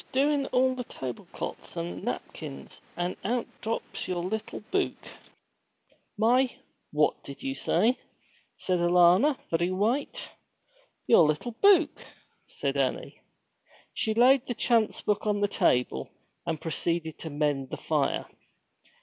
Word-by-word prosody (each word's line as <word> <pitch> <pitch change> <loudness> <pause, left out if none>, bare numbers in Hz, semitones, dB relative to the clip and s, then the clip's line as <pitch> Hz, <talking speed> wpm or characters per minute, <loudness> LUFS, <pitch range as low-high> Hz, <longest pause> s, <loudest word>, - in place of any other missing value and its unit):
'I - - -19
was - - -31
doin' 280 +1 +2
all 260 +1 +3
the 255 -1 -4
tableclot's 130 - -7
and 85 +2 -4
napkins, 70 0 -6 0.2
an' 175 +1 -1
out 235 +4 0 0.2
drops 225 +1 -4
your 175 -2 -2
little 210 +4 -4
buke!' 390 0 -1 1.1
'My 245 +4 +4 0.4
what 150 0 +1
did 140 - -9
you 270 0 -1
say?' 250 -2 +2 0.6
said 180 -2 0
Alanna, 180 - +5
very 170 +2 +1
white. 230 - -1 0.7
'Your 170 -9 +6
little 155 +11 -1
buke,' 345 - +4 0.4
said - - -3
Annie. - - -2 0.7
She 220 -1 -1
laid 255 +3 +5
the 245 - -2
chance 230 -2 +2
book 210 +1 0
on 205 -1 +1
the 205 - +2
table, 125 - +1 0.4
and 160 -2 -1
proceeded 165 0 -2
to 160 - -5
mend 145 -3 -1
the - - -5
fire. - - 0
205 Hz, 130 wpm, -28 LUFS, 160-250 Hz, 1.1 s, Your